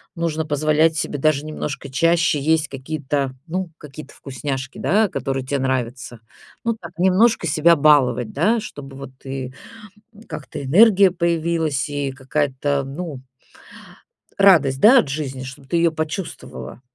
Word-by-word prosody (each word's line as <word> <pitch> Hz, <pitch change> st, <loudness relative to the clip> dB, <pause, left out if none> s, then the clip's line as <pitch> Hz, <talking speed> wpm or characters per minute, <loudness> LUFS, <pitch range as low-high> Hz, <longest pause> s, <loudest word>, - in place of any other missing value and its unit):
нужно 165 Hz, -2 st, -2 dB
позволять 155 Hz, +2 st, +2 dB
себе 145 Hz, -, -3 dB
даже 155 Hz, 0 st, +1 dB
немножко 150 Hz, -2 st, -5 dB
чаще 165 Hz, +3 st, +2 dB
есть 155 Hz, +2 st, +1 dB
какие-то, 135 Hz, -1 st, -3 dB
ну, 185 Hz, +2 st, -3 dB
какие-то 150 Hz, +1 st, -11 dB
вкусняшки, 135 Hz, 0 st, -5 dB
да, 210 Hz, +3 st, +2 dB
которые 135 Hz, -1 st, -3 dB
тебе 140 Hz, +1 st, -1 dB
нравятся. 125 Hz, -2 st, -3 dB, 0.4 s
Ну 230 Hz, -1 st, 0 dB
так, 170 Hz, -4 st, -10 dB
немножко 190 Hz, +3 st, +3 dB
себя 165 Hz, +2 st, +4 dB
баловать, 130 Hz, -6 st, +3 dB
да, 215 Hz, +11 st, +2 dB
чтобы 135 Hz, -9 st, -9 dB
вот 135 Hz, -1 st, -9 dB
и 130 Hz, -1 st, -5 dB, 0.8 s
как-то 140 Hz, 0 st, -7 dB
энергия 195 Hz, -, +6 dB
появилась 165 Hz, -4 st, -1 dB
и 145 Hz, -2 st, -3 dB
какая-то, 140 Hz, +1 st, -1 dB
ну 140 Hz, -1 st, -7 dB, 1.2 s
радость, 155 Hz, -9 st, +5 dB
да, 245 Hz, -, +7 dB
от 140 Hz, -, -1 dB
жизни, 135 Hz, -3 st, -4 dB
чтобы 135 Hz, +1 st, -10 dB
ты 155 Hz, -, -2 dB
её 170 Hz, 0 st, +3 dB
почувствовала. 155 Hz, -, -6 dB
145 Hz, 135 wpm, -21 LUFS, 135-170 Hz, 1.2 s, да